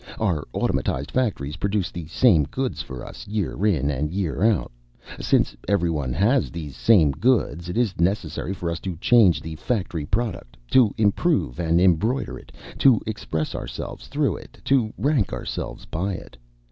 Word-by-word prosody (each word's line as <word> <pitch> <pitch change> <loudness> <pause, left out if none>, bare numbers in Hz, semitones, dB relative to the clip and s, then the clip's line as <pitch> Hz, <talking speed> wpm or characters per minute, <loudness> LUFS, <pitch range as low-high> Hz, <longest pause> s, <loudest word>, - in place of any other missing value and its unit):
Our 90 -9 0
automatized 70 +3 -1
factories 90 - -1
produce 100 -1 -1
the 85 -3 -7
same 85 - +4
goods 130 - -3
for 65 -2 -8
us - - -10
year 100 -3 -2
in 75 -8 +1
and 75 +2 -1
year 90 -2 -2
out. 110 - +2 0.5
Since - - +2
everyone 85 -9 0
has 105 - +2
these 75 -5 -7
same 90 -11 +5
goods, 90 - +1
it 90 - -3
is 115 -8 0
necessary 85 -1 0
for 90 -3 -3
us 85 - -3
to 95 0 -4
change 95 - +4
the 80 -1 -6
factory 90 -6 -2
product, 95 - -2
to 125 -6 +5
improve 110 - +1
and 85 0 +2
embroider 95 +9 +2
it, - - -17 0.3
to 130 -6 +6
express 80 -7 -3
ourselves - - -6
through - - 0
it, - - -14
to 125 -6 +2
rank 140 -8 +1
ourselves - - -5
by 95 +5 -2
it. 90 - -9
90 Hz, 160 wpm, -24 LUFS, 80-110 Hz, 0.5 s, to